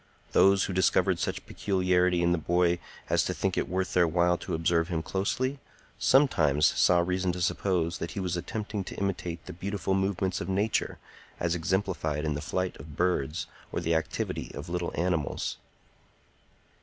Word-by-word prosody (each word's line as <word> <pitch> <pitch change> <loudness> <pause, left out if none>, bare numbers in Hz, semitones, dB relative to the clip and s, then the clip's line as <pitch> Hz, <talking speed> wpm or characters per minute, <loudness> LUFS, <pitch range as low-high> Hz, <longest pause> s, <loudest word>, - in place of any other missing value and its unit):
Those 95 0 +5
who 95 - -2
discovered 90 -1 +2
such - - -3
peculiarity 90 -2 +1
in 85 - +3
the 85 - +2
boy 85 +1 +2 0.3
as - - +2
to - - -2
think - - -1
it - - -1
worth 95 +1 -1
their 90 -1 +4
while 90 +2 +3
to - - -3
observe 85 0 +1
him 80 -3 -2
closely, 130 +10 -1 0.4
sometimes 75 - +4
saw 90 +3 +4
reason 90 +1 0
to 90 - -5
suppose 85 -1 0
that 85 - -4
he - - 0
was 90 -2 -1
attempting 105 +3 -4
to - - -7
imitate 90 -4 -3
the - - -7
beautiful 95 +2 -2
movements 95 -1 0
of - - -4
Nature 100 +3 0 0.4
as 85 -1 0
exemplified 85 -3 -1
in 75 - 0
the 75 - -4
flight 90 +3 -2
of 75 +1 -11
birds 85 -3 0 0.3
or - - -1
the 85 - 0
activity 80 -1 -2
of 70 - -7
little 90 0 -2
animals. 85 -4 -1
90 Hz, 170 wpm, -28 LUFS, 85-95 Hz, 0.4 s, Those